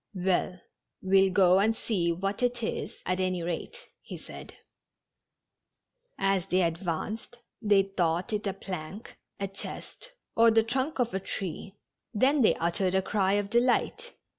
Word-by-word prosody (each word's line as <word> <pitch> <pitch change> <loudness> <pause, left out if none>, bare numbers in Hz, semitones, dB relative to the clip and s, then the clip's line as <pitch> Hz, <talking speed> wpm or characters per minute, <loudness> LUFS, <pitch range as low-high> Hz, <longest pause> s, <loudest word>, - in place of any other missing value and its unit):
"Well, 180 0 0 0.4
we'll 190 0 +4
go 185 0 +5
and 220 +3 +2
see 180 -8 0
what 195 +5 -2
it 245 -1 0
is, - - -4
at 185 0 0
any 185 -2 0
rate," 175 - -4 0.2
he - - -8
said. - - -11 1.6
As 195 -2 +1
they 185 -1 +2
advanced, 175 +7 -3 0.2
they 205 -3 +4
thought 180 +1 -1
it 210 0 -1
a 195 - -1
plank, 190 +1 -7 0.2
a 200 - -1
chest, 350 - -9 0.2
or 230 0 +6
the 225 0 +4
trunk 260 +6 -2
of 245 -2 0
a 190 - 0
tree. 190 +1 -5 0.4
Then 270 +6 +3
they 220 - +5
uttered 180 +3 0
a 190 - +2
cry 195 -1 +1
of 205 0 0
delight. 250 - +1
195 Hz, 150 wpm, -28 LUFS, 185-225 Hz, 1.6 s, or